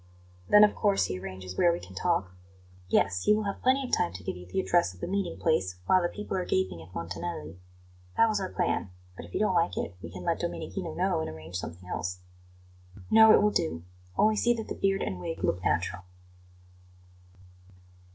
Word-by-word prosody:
"Then, 210 0 +8
of 210 - +5
course, 200 -2 +2
he 90 - -4
arranges 95 -1 -7
where 175 - +5
we 170 - -2
can 90 - -12
talk?" 95 0 0 0.6
"Yes; 90 -2 +2
he 210 - +5
will 215 - -1
have 200 -1 -4
plenty 265 +2 +3
of - - +2
time 85 - 0
to 90 +1 -9
give - - -3
you 90 0 -11
the 90 - -2
address 175 - +2
of - - -18
the - - -3
meeting 190 -1 -2
place 95 - +1
while 185 - +4
the 175 - 0
people 210 -2 -5
are 185 - 0
gaping 95 - -1
at 80 +2 -14
Montanelli. 85 - -5 0.6
That 230 - +6
was 215 -2 0
our 190 - -3
plan; 175 - -1 0.3
but 85 - -9
if 85 - -15
you - - +1
don't 210 -3 +2
like 170 -1 +1
it, 100 - -3
we 85 - -7
can 90 0 -8
let - - 0
Domenichino - - -4
know - - +1
and 80 0 -3
arrange 80 +2 -7
something 90 0 -7
else." 90 +1 -3 0.9
"No; 220 0 +8
it 205 - +6
will 210 - +4
do; 80 - -1 0.3
only 215 0 +4
see 240 +2 +3
that 220 -2 -6
the - - -2
beard 195 0 0
and 90 - -3
wig 165 - -5
look 90 - 0
natural." 95 +1 0
95 Hz, 210 wpm, -28 LUFS, -, 0.9 s, Then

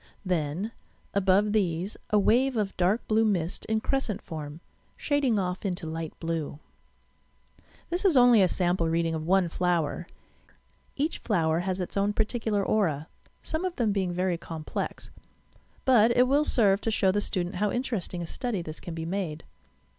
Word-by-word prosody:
Then, 175 +3 -1 0.4
above 200 +1 +3
these, 185 -1 0
a 210 - +3
wave 245 +5 +3
of 205 -2 -1
dark 185 +6 +1
blue 220 +1 +3
mist 185 -5 -1
in 220 0 0
crescent 270 -7 -1
form, 150 -1 -7 0.4
shading 280 -6 +1
off 180 -1 -2
into 180 -4 -3
light 160 0 -5
blue. 165 -3 -3 1.3
This 350 +3 0
is 365 -8 +4
only 245 -3 +7
a 185 - +5
sample 175 -2 0
reading 165 0 +1
of 160 0 -4
one 190 -1 +4
flower. 175 -1 -1 0.9
Each 300 +4 -1
flower 165 -6 +1
has 185 +1 -2
its 180 - -4
own 200 +1 +2
particular 220 -2 0
aura 160 -8 0 0.3
{some 315 +3 -3
of 365 -2 -2
them 230 -5 +1
being 190 -3 0
very 180 -1 -1
complex); 160 -2 -5 0.7
but 235 -4 +6
it 250 +1 +5
will 285 +3 +3
serve 200 -7 +3
to - - -1
show 200 -3 +2
the 205 +2 0
student 180 -2 -2
how 210 +2 +1
interesting 220 -7 -3
a - - -4
study 205 +1 -3
this 155 -1 -7
can 170 - -7
be 165 0 -4
made. 170 -4 -3
190 Hz, 165 wpm, -27 LUFS, 170-220 Hz, 1.3 s, only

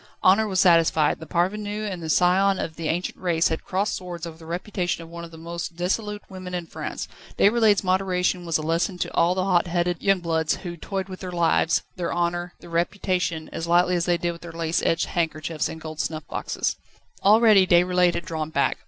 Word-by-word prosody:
Honour 200 +4 +5
was 190 -2 0
satisfied: 165 -4 +4
the 160 - -9
parvenu 205 +5 -1
and 185 -4 -5
the 160 - -5
scion 185 +4 +3
of 160 - -4
the 165 -1 -4
ancient 175 +3 -2
race 170 -2 +2
had 160 - -3
crossed 195 +3 -1
swords 175 -2 -6
over 165 -1 -7
the 160 0 -14
reputation 175 0 -3
of 165 - -12
one 170 0 -7
of 170 - -8
the 165 - -13
most 170 +1 -6
dissolute 205 +4 -2
women 185 -2 -7
in 175 -1 -3
France. - - -6 0.3
Déroulède's 215 -1 +4
moderation 185 -1 +1
was 165 -2 0
a 155 - -5
lesson 165 +4 0
to - - -3
all 170 +2 +3
the 185 - 0
hot 180 -2 +2
headed 175 0 -1
young 195 -1 +3
bloods 160 -2 0
who 175 -2 -7
toyed 190 +3 -4
with 185 -1 -8
their 185 -1 -6
lives, 170 -1 +2
their 175 -2 -2
honour, 175 0 -1
their 170 - -12
reputation 175 -1 -1
as 165 - -4
lightly 175 +1 +3
as 175 -1 0
they 175 -1 +3
did 175 +1 -1
with 170 - -11
their 170 - -8
lace 165 0 -1
edged 165 - +1
handkerchiefs 160 -2 -2
and 160 - -7
gold 155 -1 -8
snuff 155 -2 -3
boxes. - - -2 0.5
Already 210 -2 +6
Déroulède 180 0 +4
had 170 - -3
drawn 160 -3 -3
back. - - 0
175 Hz, 215 wpm, -24 LUFS, 165-185 Hz, 0.5 s, Already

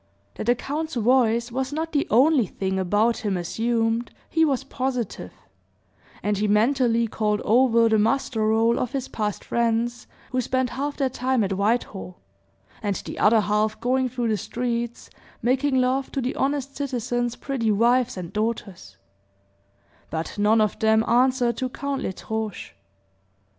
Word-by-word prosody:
That - - -6
the 240 +2 +3
count's 310 +5 -4
voice 235 0 +2
was 260 +2 -2
not 320 +2 -3
the 290 -2 0
only 260 -1 +4
thing 190 0 -2
about 210 +5 +2
him 205 -4 -2
assumed, 225 +5 -1 0.2
he 320 - +3
was 275 -4 +1
positive; 250 - -3 0.9
and 205 -1 0
he 210 - +1
mentally 230 +2 +2
called 210 -1 0
over 235 0 +4
the 220 -1 +3
muster 225 -1 +1
roll 225 +2 +3
of 250 - -3
his 270 -2 -2
past 210 -2 -3
friends, 235 +1 -1 0.2
who 255 -1 +1
spent 255 0 -1
half 285 +2 -3
their 265 -2 0
time 255 -2 0
at 195 -1 -1
Whitehall, 200 -2 -1 0.6
and 205 -3 -1
the - - -7
other 220 +1 +5
half 210 +1 0
going 255 +2 +1
through 240 -1 -2
the 215 - +1
streets, 235 +2 -4 0.3
making 265 +3 +2
love 260 +1 0
to - - -1
the 255 0 -1
honest 275 0 -1
citizens' 245 -3 -2
pretty 255 -5 -2
wives 240 +3 +2
and 175 -2 -7
daughters; 200 - -4 1.1
but 160 0 -4
none 215 +2 +4
of 215 - 0
them 220 0 +3
answered 245 -1 +2
to 255 - -2
Count 280 +1 -3
L'Estrange. 220 +2 -5
235 Hz, 155 wpm, -24 LUFS, 215-260 Hz, 1.1 s, other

